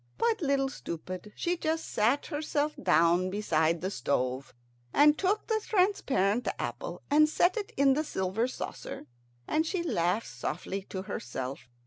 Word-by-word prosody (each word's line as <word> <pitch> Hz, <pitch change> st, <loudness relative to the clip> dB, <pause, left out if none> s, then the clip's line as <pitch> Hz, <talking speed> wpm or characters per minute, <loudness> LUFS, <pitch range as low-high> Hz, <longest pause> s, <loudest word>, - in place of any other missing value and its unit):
But 460 Hz, -3 st, +1 dB
Little 275 Hz, -2 st, +2 dB
Stupid, 185 Hz, -4 st, -6 dB
she 350 Hz, +1 st, 0 dB
just 320 Hz, 0 st, -1 dB
sat 235 Hz, +7 st, +2 dB
herself 300 Hz, -1 st, -1 dB
down 180 Hz, 0 st, +4 dB
beside 170 Hz, -5 st, +1 dB
the 190 Hz, +2 st, -2 dB
stove, 130 Hz, -2 st, -1 dB, 0.4 s
and 295 Hz, +1 st, +6 dB
took 395 Hz, +5 st, 0 dB
the 440 Hz, -1 st, 0 dB
transparent 275 Hz, -, +2 dB
apple -, -, -5 dB
and 305 Hz, +1 st, +6 dB
set 350 Hz, +4 st, +3 dB
it 425 Hz, -3 st, -4 dB
in 275 Hz, 0 st, +5 dB
the 305 Hz, +3 st, 0 dB
silver 195 Hz, -3 st, -1 dB
saucer, 255 Hz, -, -6 dB, 0.4 s
and 315 Hz, -, +2 dB
she 340 Hz, +2 st, -2 dB
laughed 205 Hz, -, 0 dB
softly 155 Hz, +10 st, -4 dB
to 190 Hz, -1 st, -4 dB
herself. 130 Hz, -5 st, -5 dB
250 Hz, 145 wpm, -30 LUFS, -, 0.4 s, and